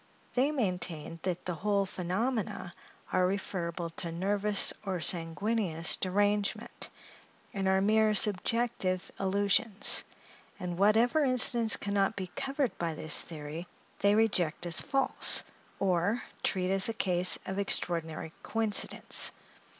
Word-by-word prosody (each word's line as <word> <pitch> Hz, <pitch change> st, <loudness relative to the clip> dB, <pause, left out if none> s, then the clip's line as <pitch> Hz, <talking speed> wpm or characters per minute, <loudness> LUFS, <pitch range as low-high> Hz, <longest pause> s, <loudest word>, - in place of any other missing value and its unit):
They 260 Hz, +3 st, +2 dB
maintain 180 Hz, -, -3 dB
that 180 Hz, -1 st, -4 dB
the 180 Hz, -, -3 dB
whole 200 Hz, +3 st, -1 dB
phenomena 190 Hz, +1 st, -3 dB, 0.4 s
are 185 Hz, -, +2 dB
referrible 170 Hz, -3 st, -4 dB
to 170 Hz, -, -5 dB
nervous 200 Hz, +4 st, +3 dB
or 190 Hz, -3 st, -3 dB
sanguineous 170 Hz, +1 st, -1 dB
derangement, 205 Hz, +2 st, -2 dB, 0.6 s
and 195 Hz, -1 st, -2 dB
are 190 Hz, 0 st, +2 dB
mere 215 Hz, +1 st, +2 dB
subjective 205 Hz, -2 st, +3 dB
illusions; 200 Hz, +2 st, +2 dB, 0.6 s
and 175 Hz, -1 st, -5 dB
whatever 225 Hz, +9 st, +3 dB
instance 240 Hz, -4 st, +4 dB
can 200 Hz, -, -5 dB
not 200 Hz, +2 st, +1 dB
be 185 Hz, -2 st, -6 dB
covered 270 Hz, -2 st, -2 dB
by 165 Hz, -2 st, -3 dB
this 155 Hz, +1 st, +2 dB
theory, 160 Hz, +2 st, -8 dB, 0.3 s
they 200 Hz, +1 st, +3 dB
reject 180 Hz, -7 st, 0 dB
as 170 Hz, -1 st, +1 dB
false, 270 Hz, -1 st, +1 dB, 0.3 s
or 190 Hz, +4 st, 0 dB, 0.2 s
treat 185 Hz, -1 st, -1 dB
as 195 Hz, +2 st, +5 dB
a -, -, -2 dB
case 180 Hz, -4 st, +3 dB
of 190 Hz, +1 st, -4 dB
extraordinary 165 Hz, -5 st, -2 dB
coincidence. 225 Hz, -2 st, +1 dB
195 Hz, 120 wpm, -29 LUFS, 175-215 Hz, 0.6 s, as